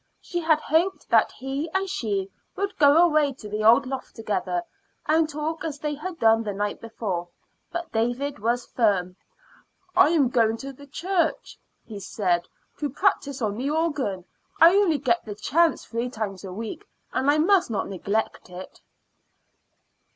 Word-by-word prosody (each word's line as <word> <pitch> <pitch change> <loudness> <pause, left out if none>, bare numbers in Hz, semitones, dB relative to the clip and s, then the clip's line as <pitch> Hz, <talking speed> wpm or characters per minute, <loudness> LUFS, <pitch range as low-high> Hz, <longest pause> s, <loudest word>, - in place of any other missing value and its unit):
She 350 - -4
had 320 -2 +3
hoped 340 +6 0
that - - +5
he 275 +4 -4
and 385 0 +1
she 205 - -2 0.2
would 400 +1 -2
go 290 0 +6
away 305 -4 +2
to 240 -4 -11
the 210 +1 -3
old 235 +5 +6
loft 260 0 -6
together, 225 +10 -2 0.4
and 315 0 +3
talk 305 +2 -4
as 310 -3 -4
they 300 +1 -3
had 335 +4 -6
done 225 -3 +4
the 210 -2 -3
night 205 +1 -2
before. 200 -6 -4 0.4
But 345 -1 -5
David 245 +4 -1
was 235 +3 0
firm. 190 -6 +1 0.8
"I 370 -2 +6
am 300 -6 +3
going 225 -2 +2
to 275 +3 -7
the 285 +2 -14
church," 355 - -1 0.3
he 210 -3 -8
said, 180 -3 -1 0.3
"to 290 - -1
practice 280 - 0
on 205 -1 -1
the 265 +4 -2
organ. 290 - -1 0.3
I 335 +2 +8
only 385 -7 +3
get 235 -3 +1
the 210 -2 -7
chance 320 +10 +1
three 235 +2 -3
times 210 -6 -5
a 190 - -7
week, 215 +3 -6 0.3
and 270 - +1
I 295 - +4
must 360 +2 +3
not 205 -4 -2
neglect 200 +2 -3
it." 180 +1 -10
265 Hz, 165 wpm, -25 LUFS, 215-320 Hz, 0.8 s, I